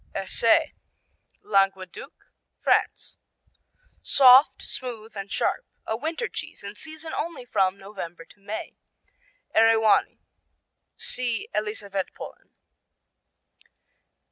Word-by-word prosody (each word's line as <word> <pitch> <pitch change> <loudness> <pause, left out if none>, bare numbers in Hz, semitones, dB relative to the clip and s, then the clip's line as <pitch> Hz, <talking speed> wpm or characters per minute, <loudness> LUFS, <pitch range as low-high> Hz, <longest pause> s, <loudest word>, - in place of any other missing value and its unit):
Erce - - +2 0.7
Languedoc, 195 - -1 0.3
France - - 0 0.8
Soft, 265 0 +6
smooth 230 -4 -6
and 200 0 -6
sharp. - - 0 0.2
A 220 - -1
winter 320 - -3
cheese - - -7
in 200 0 -7
season 315 +4 -6
only 335 -6 -4
from 195 -4 +1
November 185 -4 -8
to 205 - -21
May. 205 +2 -6 0.8
Eriwani 225 -1 +4 0.8
see 240 -3 -2
Elisavetpolen. 205 -2 -4
220 Hz, 85 wpm, -25 LUFS, 195-255 Hz, 0.8 s, Soft